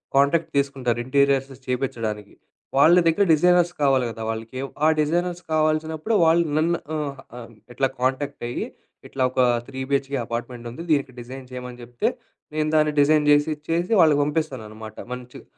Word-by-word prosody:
Contract 140 Hz, +4 st, +3 dB
తీసుకుంటారు 135 Hz, -4 st, 0 dB
interiors 140 Hz, 0 st, +2 dB, 0.2 s
చేపించడానికి. 115 Hz, -5 st, -3 dB, 0.4 s
వాళ్ళ 160 Hz, +5 st, +7 dB
దగ్గర 165 Hz, +5 st, +3 dB
డిజైనర్స్ 175 Hz, +2 st, +4 dB
కావాలి 135 Hz, -3 st, +3 dB
కదా, 115 Hz, 0 st, -8 dB
వాళ్ళకి 115 Hz, +3 st, -5 dB, 0.3 s
ఆ -, -, +6 dB
డిజైనర్స్ 175 Hz, +3 st, 0 dB
కావాల్సినప్పుడు 155 Hz, +5 st, 0 dB
వాళ్ళు 165 Hz, +1 st, +4 dB
నన్ను 170 Hz, +2 st, +2 dB, 0.6 s
ఆహ్, 115 Hz, -2 st, -9 dB, 0.2 s
ఇట్లా 135 Hz, +1 st, +1 dB
కాంటాక్ట్ 135 Hz, +1 st, -1 dB
అయ్యి, -, -, -3 dB, 0.4 s
ఇట్లా 130 Hz, -1 st, -2 dB
ఒక 130 Hz, -, -4 dB, 0.3 s
3 130 Hz, -, -7 dB
బిహెచ్‌కే 140 Hz, 0 st, 0 dB
అపార్ట్మెంట్ 120 Hz, 0 st, -5 dB
ఉంది 165 Hz, +8 st, -8 dB
దీనికి 140 Hz, -3 st, +1 dB
డిజైన్ 130 Hz, +1 st, -9 dB
చేయమని 125 Hz, -1 st, -8 dB
చెప్తె. 120 Hz, 0 st, -1 dB, 0.5 s
నేను 155 Hz, 0 st, 0 dB
దాన్ని 150 Hz, 0 st, +3 dB
డిజైన్ 150 Hz, +1 st, +4 dB
చేసిచ్చేసి 155 Hz, +5 st, +1 dB
వాళ్ళకి 150 Hz, -3 st, +5 dB
పంపిస్తాను 145 Hz, -5 st, -2 dB
అనమాట. 110 Hz, 0 st, -10 dB, 0.2 s
మంచిగ 125 Hz, 0 st, -10 dB
140 Hz, 145 wpm, -23 LUFS, 125-155 Hz, 0.6 s, వాళ్ళ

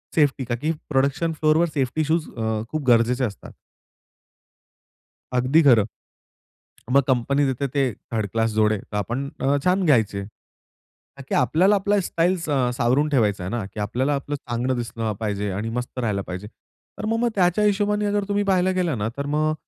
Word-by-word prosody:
Safety, 145 Hz, -4 st, +2 dB
का 120 Hz, 0 st, -2 dB
की 155 Hz, +7 st, -1 dB, 0.2 s
production 145 Hz, +4 st, +1 dB
फ्लोरवर 155 Hz, +2 st, +3 dB
safety 140 Hz, +2 st, 0 dB
shoes 160 Hz, +1 st, 0 dB
अ, 110 Hz, -1 st, -1 dB
खूप 155 Hz, -1 st, -3 dB
गरजेचे 120 Hz, +2 st, +3 dB
असतात. 100 Hz, -6 st, -8 dB, 1.8 s
अगदी 130 Hz, +6 st, +3 dB
खरं. 120 Hz, -7 st, +6 dB, 1.1 s
मग 140 Hz, -, +7 dB
कंपनी 140 Hz, +3 st, +2 dB
देते 135 Hz, +1 st, -1 dB
ते 140 Hz, -, +3 dB, 0.3 s
थर्ड 110 Hz, -2 st, 0 dB
क्लास 115 Hz, 0 st, +1 dB
जोडे, 110 Hz, 0 st, +3 dB
तर 105 Hz, +1 st, -7 dB
आपण 120 Hz, +7 st, -3 dB
अ, 140 Hz, +1 st, +3 dB
छान 185 Hz, +1 st, +2 dB
घ्यायचे. 110 Hz, -, +2 dB
का 105 Hz, -, -17 dB, 0.8 s
की -, -, 0 dB
आपल्याला 180 Hz, +10 st, +3 dB
आपली 200 Hz, +1 st, +1 dB
स्टाईल 175 Hz, +1 st, +1 dB
सा 140 Hz, -6 st, 0 dB
अ, -, -, 0 dB
सावरून 125 Hz, +5 st, +1 dB
ठेवायची 105 Hz, -9 st, +1 dB
आहे 90 Hz, -, -4 dB
ना, 120 Hz, -3 st, -2 dB
की 105 Hz, -, -10 dB
आपल्याला 125 Hz, +7 st, 0 dB
आपलं 140 Hz, +1 st, -3 dB
चांगलं 125 Hz, -1 st, -2 dB
दिसलं 115 Hz, -2 st, -3 dB
पाहिजे 105 Hz, -2 st, -2 dB
आणि 105 Hz, +4 st, -3 dB
मस्त 125 Hz, +1 st, -6 dB
राहायला 105 Hz, -5 st, -1 dB
पाहिजे. 95 Hz, +3 st, -5 dB, 0.5 s
तर -, -, -5 dB
मग-मग 230 Hz, +2 st, +1 dB
त्याच्या 180 Hz, +2 st, +2 dB
हिशोबाने 210 Hz, 0 st, +1 dB
जर 205 Hz, -1 st, +1 dB
तुम्ही 205 Hz, 0 st, +1 dB
पाहिलं 185 Hz, -1 st, +2 dB
गेलं 175 Hz, -7 st, 0 dB
ना, 105 Hz, +1 st, -1 dB
तर 140 Hz, -, -3 dB
मग 155 Hz, 0 st, +1 dB
135 Hz, 175 wpm, -23 LUFS, 115-165 Hz, 1.8 s, मग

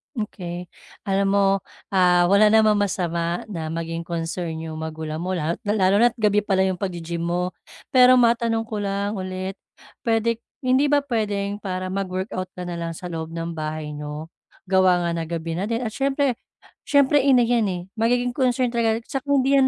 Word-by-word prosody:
Okey, 180 Hz, -5 st, -5 dB, 0.3 s
alam 195 Hz, 0 st, +1 dB
mo, 195 Hz, -1 st, +3 dB, 0.3 s
ah, 180 Hz, -2 st, +4 dB
wala 205 Hz, +2 st, +6 dB
namang 215 Hz, -1 st, +4 dB
masama 175 Hz, -3 st, -1 dB
na 160 Hz, -4 st, -4 dB
maging 165 Hz, +1 st, -4 dB
concern 165 Hz, 0 st, -3 dB
'yong 160 Hz, -1 st, -6 dB
magulang 160 Hz, 0 st, -5 dB
mo, 185 Hz, +2 st, -2 dB
lalo 165 Hz, 0 st, -1 dB
lalo 195 Hz, -2 st, +3 dB
na't 240 Hz, 0 st, +4 dB
gabi 210 Hz, -2 st, +3 dB
pala 195 Hz, -2 st, +1 dB
'yong 190 Hz, -2 st, -1 dB
pag-gi-gym 170 Hz, -3 st, -3 dB
mo. 180 Hz, +1 st, -1 dB, 0.4 s
Pero 255 Hz, 0 st, +7 dB
matanong 230 Hz, -2 st, +3 dB
ko 220 Hz, -1 st, -5 dB
lang 200 Hz, +1 st, -2 dB
ulit, 185 Hz, +1 st, -4 dB, 0.5 s
puwede 230 Hz, 0 st, +1 dB, 0.2 s
hindi 260 Hz, +3 st, +3 dB
ba 290 Hz, -1 st, +3 dB
puwedeng 205 Hz, -4 st, -1 dB
para 185 Hz, -1 st, -3 dB
mag-workout 185 Hz, -1 st, -3 dB
ka 180 Hz, -, -5 dB
na 175 Hz, -, -4 dB
lang 165 Hz, 0 st, -3 dB
sa 180 Hz, -, -7 dB
loob 160 Hz, -1 st, -4 dB
ng 165 Hz, 0 st, -4 dB
bahay 155 Hz, -1 st, -4 dB
niyo? 150 Hz, +2 st, -6 dB, 0.4 s
Gawa 185 Hz, -2 st, +3 dB
nga -, -, 0 dB
ng 165 Hz, -1 st, -3 dB
gabi 165 Hz, -1 st, -3 dB
na 175 Hz, +4 st, -2 dB
din 235 Hz, +1 st, -1 dB
at 220 Hz, -, -4 dB
siyempre, 275 Hz, -1 st, +1 dB, 0.5 s
siyempre 285 Hz, 0 st, +4 dB
ina 260 Hz, -3 st, +5 dB
yan, 230 Hz, -3 st, +2 dB
eh, 180 Hz, -2 st, -3 dB, 0.2 s
magiging 245 Hz, +2 st, +2 dB
concern 255 Hz, -2 st, +1 dB
talaga 225 Hz, -1 st, +2 dB
'saka 270 Hz, -1 st, -4 dB
hindi 275 Hz, -1 st, +3 dB
'yan, 270 Hz, -1 st, +5 dB
195 Hz, 175 wpm, -23 LUFS, 170-230 Hz, 0.5 s, Pero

